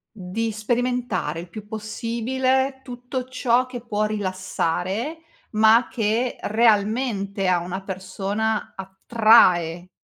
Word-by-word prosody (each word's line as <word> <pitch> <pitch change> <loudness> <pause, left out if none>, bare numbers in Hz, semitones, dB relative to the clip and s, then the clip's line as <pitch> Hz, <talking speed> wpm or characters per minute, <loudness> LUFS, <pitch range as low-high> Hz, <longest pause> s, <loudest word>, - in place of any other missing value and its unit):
Di 215 +4 -3
sperimentare, 235 - -1
il 175 +1 -9
più 210 +4 -9
possibile 255 +5 -1
tutto 250 0 -6
ciò 255 -1 +1
che 255 -1 -7
può 215 -3 -1
rilassare 190 - -2 0.4
ma 220 +3 +5
che 230 +2 -1
realmente 210 -2 +1
a 180 -1 +4
una 180 +3 -5
persona 200 +3 -3
attrae, 190 -3 +3
220 Hz, 100 wpm, -23 LUFS, 195-245 Hz, 0.4 s, ma